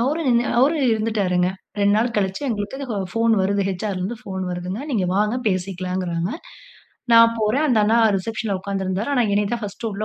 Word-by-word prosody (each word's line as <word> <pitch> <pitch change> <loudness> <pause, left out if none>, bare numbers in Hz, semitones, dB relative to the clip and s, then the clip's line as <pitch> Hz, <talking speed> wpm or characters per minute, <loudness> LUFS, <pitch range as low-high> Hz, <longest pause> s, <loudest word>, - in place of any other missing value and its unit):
அவரும் 295 +6 0
நின்னு 240 0 +3
அவரும் 280 0 +3
இருந்துட்டாருங்க. 200 -5 +1 0.3
2 200 0 +3
நாள் 230 +1 0
கழிச்சு 195 +5 -1
எங்களுக்கு 235 +5 -4
ஹோ 210 - -2 0.2
ஃபோன் 230 0 +2
வருது, 200 +1 +1
ஹச்.ஆர்.ல 190 0 -3
இருந்து 205 +6 -3
ஃபோன் 190 -3 -5
வருதுங்க. 180 +5 -4
நீங்க 205 -7 0
வாங்க 210 +4 +1
பேசிக்கலாங்குறாங்க. 185 -1 -2 0.8
நான் 230 0 +7
போறேன், 220 +8 +1
அந்த 235 -4 +3
அண்ணா 225 +2 +3 0.2
ரிசப்ஷன்ல 210 0 -3
உட்கார்ந்து 195 0 -3
இருந்தாரு. 190 +7 -2
ஆனா 245 - +3
என்னைய 205 0 +2
தான் 235 -2 -2
பர்ஸ்ட் 205 +3 -5
உள்ள 205 +2 -3
210 Hz, 180 wpm, -22 LUFS, 190-230 Hz, 0.8 s, நான்